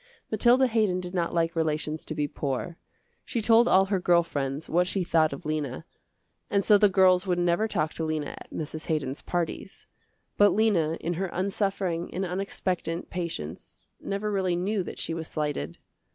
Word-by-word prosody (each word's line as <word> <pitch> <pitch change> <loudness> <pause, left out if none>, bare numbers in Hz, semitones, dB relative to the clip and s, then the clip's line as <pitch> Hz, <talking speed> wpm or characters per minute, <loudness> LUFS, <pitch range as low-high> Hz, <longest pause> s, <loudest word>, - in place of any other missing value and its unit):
Mathilda 240 +4 +5
Haydon 215 -6 +1
did 180 0 -7
not 170 -2 0
like 165 0 0
relations 155 -1 -1
to 155 - -4
be 150 -1 0
poor. 140 +4 -3 0.5
She 240 - -3
told 230 +2 +5
all 190 +1 +5
her 195 -1 0
girl 175 -1 +4
friends 140 -2 -3
what 175 +2 +2
she 190 0 -1
thought 160 -2 +3
of 140 - -8
Lena, 150 -4 -3 0.6
and 200 0 +2
so 205 0 +6
the 210 - +6
girls 185 0 +4
would 180 -1 +1
never 175 +4 +2
talk 155 -7 -1
to 165 - -4
Lena 155 -2 -2
at - - -12
Mrs. 155 0 -6
Haydon's 145 -4 -2
parties. 175 +2 -4 0.5
But 205 0 +6
Lena 190 -7 +2
in 175 - -2
her 190 +3 -2
unsuffering 190 -2 -1
and 190 +1 -1
unexpectant 180 -2 -3
patience 160 - -6
never 200 +2 -3
really 190 -3 +1
knew 195 +4 0
that 175 - -7
she 165 - -3
was 165 -1 -4
slighted. 150 - -3
175 Hz, 180 wpm, -27 LUFS, 155-195 Hz, 0.6 s, so